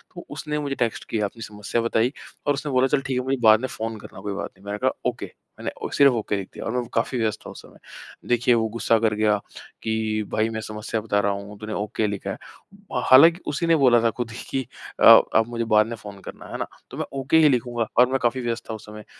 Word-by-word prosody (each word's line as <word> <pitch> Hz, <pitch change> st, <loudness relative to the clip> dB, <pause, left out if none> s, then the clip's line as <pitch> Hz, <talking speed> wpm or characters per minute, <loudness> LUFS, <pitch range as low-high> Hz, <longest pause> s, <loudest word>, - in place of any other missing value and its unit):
तो 175 Hz, -, -9 dB
उसने 150 Hz, +1 st, -4 dB
मुझे 140 Hz, -2 st, -3 dB
टेक्स्ट 120 Hz, -4 st, -1 dB
किया 110 Hz, -2 st, 0 dB
अपनी 115 Hz, +3 st, -8 dB
समस्या 105 Hz, +2 st, -3 dB
बताई 115 Hz, +1 st, +1 dB, 0.4 s
और 145 Hz, -, +4 dB
उसने 145 Hz, +1 st, -4 dB
बोला, 130 Hz, 0 st, +3 dB
"चल 140 Hz, +1 st, +1 dB
ठीक 135 Hz, -2 st, -3 dB
है, 125 Hz, -, -4 dB
मुझे 135 Hz, +1 st, 0 dB
बाद 110 Hz, -1 st, +7 dB
में 130 Hz, -, -1 dB
फ़ोन 115 Hz, -2 st, -5 dB
करना 95 Hz, -, -11 dB
कोई 100 Hz, 0 st, -4 dB
बात 100 Hz, -, -4 dB
नहीं।" 95 Hz, -, -20 dB
मैंने 100 Hz, +1 st, -3 dB
कहा, -, -, +1 dB
"ओके।" -, -, -3 dB, 0.3 s
मैंने -, -, -3 dB, 0.2 s
सिर्फ़ 140 Hz, -2 st, +6 dB
ओके 110 Hz, -2 st, -1 dB
लिख 95 Hz, -1 st, -5 dB
दिया -, -, -7 dB
और -, -, -2 dB
मैं 125 Hz, +1 st, -1 dB
काफ़ी 115 Hz, +3 st, 0 dB
व्यस्त 110 Hz, -1 st, -1 dB
था -, -, -7 dB
उस -, -, -10 dB
समय। -, -, -17 dB, 0.5 s
देखिए 120 Hz, 0 st, +3 dB
वो 110 Hz, -1 st, +1 dB
गुस्सा 115 Hz, +1 st, +1 dB
कर 110 Hz, -1 st, +1 dB
गया 105 Hz, 0 st, +2 dB, 0.5 s
कि, 110 Hz, -1 st, -1 dB
"भई 110 Hz, +1 st, +1 dB
मैं 110 Hz, -1 st, -4 dB
समस्या 110 Hz, +1 st, -4 dB
बता 105 Hz, -2 st, 0 dB
रहा 100 Hz, 0 st, +1 dB
हूँ। 100 Hz, +1 st, -7 dB
तूने 110 Hz, 0 st, -6 dB
ओके 105 Hz, +1 st, -1 dB
लिखा 100 Hz, -1 st, -4 dB
है।" -, -, -5 dB, 0.7 s
हालाँकि 165 Hz, +7 st, +7 dB
उसी 150 Hz, +4 st, -1 dB
ने 165 Hz, -, +5 dB
बोला 125 Hz, -6 st, +5 dB
था 115 Hz, -, +3 dB
खुद 120 Hz, -2 st, -3 dB
ही 115 Hz, -, -8 dB
कि, 135 Hz, -, -1 dB, 0.4 s
"अ, -, -, 0 dB, 0.3 s
आप 110 Hz, 0 st, +4 dB
मुझे 120 Hz, -1 st, -3 dB
बाद 105 Hz, 0 st, +5 dB
में 115 Hz, -, -5 dB
फ़ोन 100 Hz, -3 st, -11 dB
करना।" -, -, -9 dB
है -, -, -4 dB
ना? -, -, -3 dB, 0.2 s
तो -, -, -8 dB
मैं -, -, -2 dB
ओके 135 Hz, +4 st, +2 dB
ही 155 Hz, -2 st, +6 dB
लिखूँगा 120 Hz, -3 st, 0 dB
और 125 Hz, -, +7 dB
मैं 135 Hz, -, +1 dB
काफी 120 Hz, +2 st, +1 dB
व्यस्त 120 Hz, -1 st, -3 dB
था -, -, -3 dB
उस 110 Hz, -, -9 dB
समय। 105 Hz, 0 st, -11 dB
115 Hz, 255 wpm, -24 LUFS, 105-130 Hz, 0.7 s, बाद